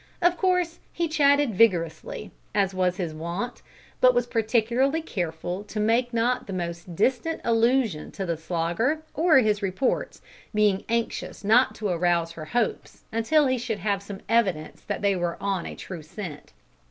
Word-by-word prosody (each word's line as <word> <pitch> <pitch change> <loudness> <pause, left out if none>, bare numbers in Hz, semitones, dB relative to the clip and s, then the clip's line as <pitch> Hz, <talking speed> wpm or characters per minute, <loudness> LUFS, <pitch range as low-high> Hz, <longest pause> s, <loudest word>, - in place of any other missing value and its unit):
Of 350 0 +3
course 360 -2 +1
he 340 0 -1
chatted 285 -5 +3
vigorously, 175 -6 +1 0.2
as 195 -2 +2
was 185 -1 +1
his 175 -5 -3
wont, 170 +10 -4 0.4
but 255 -1 +5
was 245 0 +2
particularly 240 +6 +1
careful 175 - -3
to 210 +1 -5
make 230 +3 +2
not 240 +2 0
the 195 - -5
most 170 -1 -5
distant 265 - +1
allusion 230 -6 +2
to 195 - -4
the 170 -2 -1
Slogger 175 - -1
or 320 -1 +4
his 215 -4 +3
reports, 195 +7 -1 0.4
being 210 -2 +2
anxious 230 -1 -2
not 225 +5 +4
to 210 -2 -3
arouse 170 -1 +1
her 165 -2 -8
hopes 235 +6 -2
until 255 +7 +3
he 260 -1 +1
should 225 -2 -2
have 200 0 -1
some 200 -1 -8
evidence 195 -9 0
that - - -4
they 200 -1 +3
were 175 -2 -2
on 195 -3 -2
a - - -7
true 180 -4 -7
scent. 155 -1 -8
210 Hz, 165 wpm, -26 LUFS, 180-250 Hz, 0.4 s, but